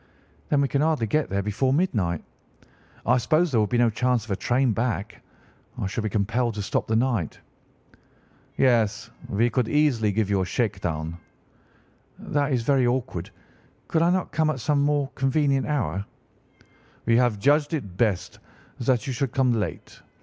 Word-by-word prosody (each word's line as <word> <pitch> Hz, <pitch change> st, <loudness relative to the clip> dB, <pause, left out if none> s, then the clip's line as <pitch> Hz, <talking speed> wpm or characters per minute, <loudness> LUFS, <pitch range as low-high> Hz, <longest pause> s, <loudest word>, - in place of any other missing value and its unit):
"'Then 145 Hz, -2 st, +3 dB
we 140 Hz, -, +2 dB
can 140 Hz, +1 st, 0 dB
hardly 155 Hz, -6 st, +1 dB
get 150 Hz, +8 st, 0 dB
there 100 Hz, +1 st, -1 dB
before 110 Hz, +6 st, 0 dB
midnight. 110 Hz, -, 0 dB, 0.8 s
I 125 Hz, +2 st, +4 dB
suppose 155 Hz, +7 st, +2 dB
there 115 Hz, -4 st, +3 dB
would 105 Hz, -, 0 dB
be 120 Hz, -, +1 dB
no 120 Hz, -1 st, +3 dB
chance 125 Hz, 0 st, 0 dB
of 110 Hz, -, -8 dB
a -, -, +1 dB
train 125 Hz, +5 st, +1 dB
back. 110 Hz, -2 st, -3 dB, 0.6 s
I -, -, -2 dB
should 100 Hz, +4 st, -3 dB
be 110 Hz, -, -1 dB
compelled 115 Hz, +3 st, 0 dB
to 105 Hz, -, -3 dB
stop -, -, -1 dB
the 110 Hz, -, +1 dB
night.' 115 Hz, -, 0 dB, 1.2 s
"'Yes, 115 Hz, -3 st, +2 dB, 0.2 s
we 115 Hz, +4 st, +1 dB
could 125 Hz, -1 st, +1 dB
easily 130 Hz, -8 st, +2 dB
give 105 Hz, 0 st, 0 dB
you 100 Hz, -1 st, +1 dB
a -, -, 0 dB
shake 105 Hz, -1 st, -1 dB
down.' 80 Hz, 0 st, -3 dB, 1.0 s
"'That 145 Hz, 0 st, -1 dB
is 125 Hz, -3 st, +1 dB
very 130 Hz, 0 st, +3 dB
awkward. 120 Hz, -9 st, -2 dB, 0.6 s
Could 160 Hz, -, +1 dB
I 170 Hz, -, +4 dB
not 185 Hz, 0 st, 0 dB
come 155 Hz, 0 st, +1 dB
at 135 Hz, -, -2 dB
some 140 Hz, +4 st, +1 dB
more 145 Hz, -1 st, +1 dB
convenient 135 Hz, 0 st, +1 dB
hour?' 100 Hz, -, -1 dB, 1.0 s
"'We 115 Hz, 0 st, +4 dB
have 120 Hz, -4 st, +2 dB
judged 145 Hz, +7 st, +2 dB
it 100 Hz, -, -6 dB
best 100 Hz, -3 st, -1 dB, 0.4 s
that 125 Hz, 0 st, +1 dB
you 135 Hz, -, -3 dB
should 130 Hz, 0 st, -2 dB
come 130 Hz, -3 st, +2 dB
late. 110 Hz, -2 st, -4 dB
120 Hz, 175 wpm, -25 LUFS, 105-140 Hz, 1.2 s, I